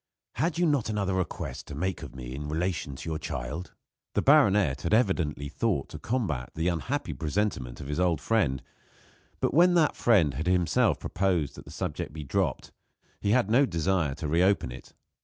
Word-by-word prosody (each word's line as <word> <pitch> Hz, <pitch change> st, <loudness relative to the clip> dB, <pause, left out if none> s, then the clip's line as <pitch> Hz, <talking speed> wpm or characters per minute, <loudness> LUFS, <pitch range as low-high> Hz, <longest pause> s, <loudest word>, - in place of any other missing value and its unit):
Had 165 Hz, 0 st, 0 dB
you 175 Hz, -, +3 dB
not 145 Hz, -8 st, +1 dB
another 100 Hz, -3 st, -1 dB
request 95 Hz, -3 st, -3 dB
to 70 Hz, -, -7 dB
make 90 Hz, +4 st, -2 dB
of -, -, -9 dB
me 65 Hz, -1 st, -7 dB
in 75 Hz, +2 st, -5 dB
relation 80 Hz, -3 st, -2 dB
to 65 Hz, -, -8 dB
your 80 Hz, -1 st, -2 dB
child?" 75 Hz, +5 st, -5 dB, 0.4 s
The -, -, +2 dB
baronet 105 Hz, -, +4 dB
had 85 Hz, +7 st, +2 dB
evidently 85 Hz, -, +1 dB
thought 85 Hz, -, -1 dB
to -, -, -8 dB
combat 95 Hz, -, -2 dB
the 80 Hz, +3 st, +1 dB
unhappy 90 Hz, -, -2 dB
presentiment 75 Hz, -, -2 dB
of -, -, -7 dB
his 75 Hz, +3 st, -2 dB
old 90 Hz, -4 st, +2 dB
friend, 75 Hz, -9 st, +1 dB, 0.8 s
but -, -, 0 dB
when 175 Hz, +4 st, +5 dB
that 160 Hz, -4 st, +3 dB
friend 90 Hz, -, +3 dB
had 80 Hz, +7 st, -4 dB
himself 90 Hz, -2 st, +3 dB
proposed 90 Hz, -6 st, 0 dB
that -, -, -11 dB
the -, -, -11 dB
subject -, -, -4 dB
be 80 Hz, -1 st, -6 dB
dropped 70 Hz, -, -1 dB, 0.5 s
he 100 Hz, -, -1 dB
had 110 Hz, -1 st, +3 dB
no 135 Hz, +4 st, +5 dB
desire 85 Hz, -, 0 dB
to 75 Hz, 0 st, -4 dB
reopen 90 Hz, -1 st, +2 dB
it. -, -, -11 dB
90 Hz, 185 wpm, -28 LUFS, 75-105 Hz, 0.8 s, when